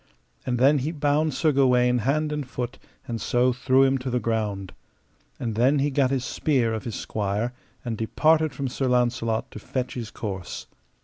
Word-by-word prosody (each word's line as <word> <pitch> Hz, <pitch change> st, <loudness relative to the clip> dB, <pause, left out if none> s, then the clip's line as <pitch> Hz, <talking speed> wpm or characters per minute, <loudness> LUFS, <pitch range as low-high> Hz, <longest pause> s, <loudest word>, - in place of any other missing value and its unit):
And 125 Hz, -1 st, +1 dB
then 140 Hz, +4 st, +5 dB
he 145 Hz, +5 st, -2 dB
bound 150 Hz, -1 st, +1 dB
Sir 160 Hz, -2 st, +3 dB
Gawaine 125 Hz, -3 st, +3 dB
hand 150 Hz, +6 st, 0 dB
and 150 Hz, -4 st, -3 dB
foot, 125 Hz, +1 st, -4 dB, 0.3 s
and 115 Hz, -2 st, -4 dB
so 125 Hz, +3 st, +2 dB
threw 130 Hz, +2 st, +3 dB
him 135 Hz, 0 st, +3 dB
to 130 Hz, +1 st, -4 dB
the 125 Hz, 0 st, 0 dB
ground. 105 Hz, -5 st, -2 dB, 0.7 s
And 115 Hz, -2 st, -2 dB
then 125 Hz, +7 st, +3 dB
he 145 Hz, +1 st, +1 dB
gat 135 Hz, -1 st, +2 dB
his 130 Hz, -2 st, -1 dB
spear 125 Hz, -7 st, +1 dB
of 110 Hz, +3 st, -4 dB
his 115 Hz, -, -4 dB
squire, 105 Hz, +3 st, -2 dB, 0.3 s
and 115 Hz, -3 st, -3 dB
departed 155 Hz, +7 st, +3 dB
from 140 Hz, -1 st, -3 dB
Sir 130 Hz, +1 st, -2 dB
Launcelot 120 Hz, -2 st, +1 dB
to -, -, -8 dB
fetch 125 Hz, +3 st, -3 dB
his 115 Hz, -4 st, -5 dB
course. 95 Hz, -6 st, -6 dB
125 Hz, 185 wpm, -25 LUFS, 115-140 Hz, 0.7 s, then